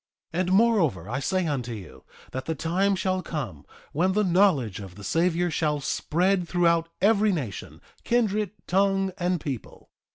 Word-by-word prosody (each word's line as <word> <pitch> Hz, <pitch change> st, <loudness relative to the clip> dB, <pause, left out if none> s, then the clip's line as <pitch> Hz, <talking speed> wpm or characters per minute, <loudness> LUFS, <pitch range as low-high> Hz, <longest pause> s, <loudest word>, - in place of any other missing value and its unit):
3:20 170 Hz, -, -1 dB
And 185 Hz, 0 st, -1 dB
moreover, 190 Hz, -, +3 dB
I 120 Hz, +5 st, -2 dB
say 185 Hz, +5 st, 0 dB
unto 130 Hz, -6 st, -2 dB
you, 100 Hz, -7 st, -10 dB, 0.3 s
that 130 Hz, 0 st, -5 dB
the 160 Hz, -, -2 dB
time 185 Hz, +6 st, +1 dB
shall 185 Hz, 0 st, -1 dB
come 120 Hz, -, -6 dB, 0.2 s
when 180 Hz, +5 st, +1 dB
the 210 Hz, +2 st, +2 dB
knowledge 175 Hz, -, +2 dB
of 95 Hz, -3 st, -9 dB
the 105 Hz, -, -11 dB
Savior 170 Hz, -, +1 dB
shall 150 Hz, -1 st, 0 dB
spread 180 Hz, +6 st, 0 dB
throughout 170 Hz, -2 st, +2 dB
every 210 Hz, +1 st, +4 dB
nation, 135 Hz, -, -5 dB, 0.2 s
kindred, 215 Hz, -4 st, +1 dB, 0.2 s
tongue, 195 Hz, 0 st, +2 dB
and 180 Hz, 0 st, 0 dB
people. 135 Hz, -6 st, -7 dB
175 Hz, 160 wpm, -26 LUFS, 140-190 Hz, 0.3 s, every